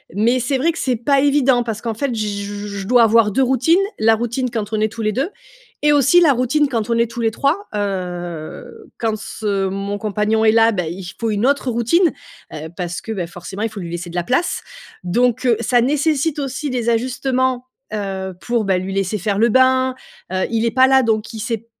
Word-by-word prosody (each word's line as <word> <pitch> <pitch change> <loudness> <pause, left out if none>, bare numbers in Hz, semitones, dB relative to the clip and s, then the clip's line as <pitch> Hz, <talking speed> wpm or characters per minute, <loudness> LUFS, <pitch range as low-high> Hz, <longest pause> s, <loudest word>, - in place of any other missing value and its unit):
Mais 235 +5 +2
c'est 265 +3 0
vrai 315 +6 +2
que, 330 - -8
c'est 255 -2 0
pas 275 +5 +2
évident, 275 -3 +3
parce 225 -2 -4
qu'en 230 -1 -2
fait 265 +3 -2
j 205 -2 -3
je 205 -1 -6
dois 245 +1 +5
avoir 225 -1 +4
2 265 +7 +2
routines: 265 +7 +3 0.2
la 225 +1 +4
routine 240 +3 -2
quand 220 -2 -4
on 215 - +1
est 215 0 +1
tous 230 - -7
les 215 - +1
2 270 - -1 0.5
et 295 - +5
aussi 290 +5 +5
la 320 -4 +6
routine 265 +4 +1
quand 230 -4 -2
on 230 - +2
est 235 0 +1
tous 240 - -5
les 225 - +2
3. 305 - 0
Heu, 180 - -5
quand 225 -2 -1
ce 205 -2 -2
mon 195 +1 -3
compagnon 215 +1 0
est 220 - +5
là, 225 0 +5
bah, 180 -6 -2
il 180 +3 -6
faut 230 - -1
une 210 +2 0
autre 280 -1 +1
routine, 265 +9 +2 0.4
heu, 155 +1 -6
parce 175 -1 -4
que, 225 - -7
bah, 185 -6 -3
forcément 175 +4 -8
il 225 - 0
faut 210 - -8
lui 170 -3 -6
laisser 175 0 -5
de 170 - -10
la 175 - 0
place! 255 - 0 0.4
Donc, 245 +7 +1
heu, 240 -2 +4
ça 240 +1 +2
nécessite 295 +3 +1
aussi 275 +1 -3
des 240 -2 -1
ajustements, 255 +1 0 0.3
heu, 190 -2 -4
pour, 235 -2 0
bah 190 -1 +2
lui 190 +1 -5
laisser 195 +1 -1
faire 200 +1 -1
le 230 +3 +4
bain, 260 +1 +3 0.4
heu, 185 0 0
il 230 0 0
est 230 - +1
pas 260 +2 +5
là 265 0 +5
donc 220 -1 -1
il 220 - -6
sait 225 +2 -2
p 230 - -27
230 Hz, 230 wpm, -19 LUFS, 205-260 Hz, 0.5 s, la